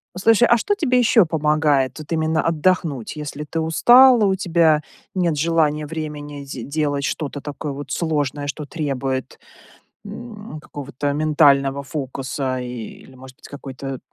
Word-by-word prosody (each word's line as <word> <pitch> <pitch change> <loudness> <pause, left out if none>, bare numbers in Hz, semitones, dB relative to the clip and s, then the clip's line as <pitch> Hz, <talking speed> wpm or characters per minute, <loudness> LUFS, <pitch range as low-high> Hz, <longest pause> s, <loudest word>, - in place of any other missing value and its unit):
Слушай, 225 +5 +4
а 235 - +6
что 410 - 0
тебе 255 -10 +2
еще 225 -4 +5
помогает, 150 -4 +1
вот, 155 - -10
именно 160 0 +1
отдохнуть? 165 -6 0
Если 150 0 -6
ты 165 - -2
устала, 240 +9 +6
у 190 -1 +2
тебя 165 -5 +2 0.3
нет 170 -5 +1
желания, 155 -1 +1
времени, 150 -2 -6
де 135 -3 -7
делать 145 0 -1
что-то 145 -1 -3
такое 145 +1 -5
вот 145 +1 -8
сложное, 145 -3 -1
что 145 +1 -5
требует, 135 -4 -3 0.7
м, 210 -4 -9
какого-то 145 -1 -4
ментального 140 -2 +3
фокуса, 135 -2 -4
и, 125 - -5 0.4
или, 130 - -17
может 130 0 -13
быть, - - -14
какой-то, 135 -1 -7
150 Hz, 145 wpm, -21 LUFS, 140-170 Hz, 0.7 s, а